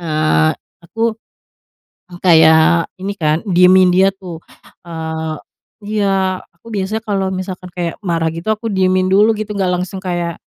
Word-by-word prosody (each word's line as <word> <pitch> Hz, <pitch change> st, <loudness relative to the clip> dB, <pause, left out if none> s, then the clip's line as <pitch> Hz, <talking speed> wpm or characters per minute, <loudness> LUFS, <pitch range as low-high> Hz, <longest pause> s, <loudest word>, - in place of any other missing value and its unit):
eee, 155 Hz, -1 st, +1 dB, 0.3 s
aku, 225 Hz, +4 st, -2 dB, 1.0 s
kayak 165 Hz, -1 st, +4 dB
ini 195 Hz, +2 st, -4 dB
kan, 155 Hz, -3 st, 0 dB
diemin 185 Hz, 0 st, +5 dB
dia 190 Hz, +1 st, +4 dB
tuh, 185 Hz, -4 st, -10 dB, 0.4 s
eee, 160 Hz, -1 st, -5 dB, 0.5 s
iya, 195 Hz, -3 st, 0 dB
aku 175 Hz, -, -20 dB
biasanya 205 Hz, +2 st, -2 dB
kalau 195 Hz, -3 st, -1 dB
misalkan 185 Hz, -1 st, -6 dB
kayak 175 Hz, -2 st, -3 dB
marah 165 Hz, -3 st, 0 dB
gitu, 170 Hz, +6 st, -3 dB
aku 220 Hz, +1 st, -3 dB
diemin 185 Hz, -1 st, +1 dB
dulu 210 Hz, +3 st, +5 dB
gitu, 215 Hz, 0 st, -5 dB
nggak 190 Hz, -2 st, 0 dB
langsung 190 Hz, +1 st, -6 dB
kayak, 175 Hz, -2 st, -3 dB
185 Hz, 135 wpm, -16 LUFS, 165-195 Hz, 1.0 s, diemin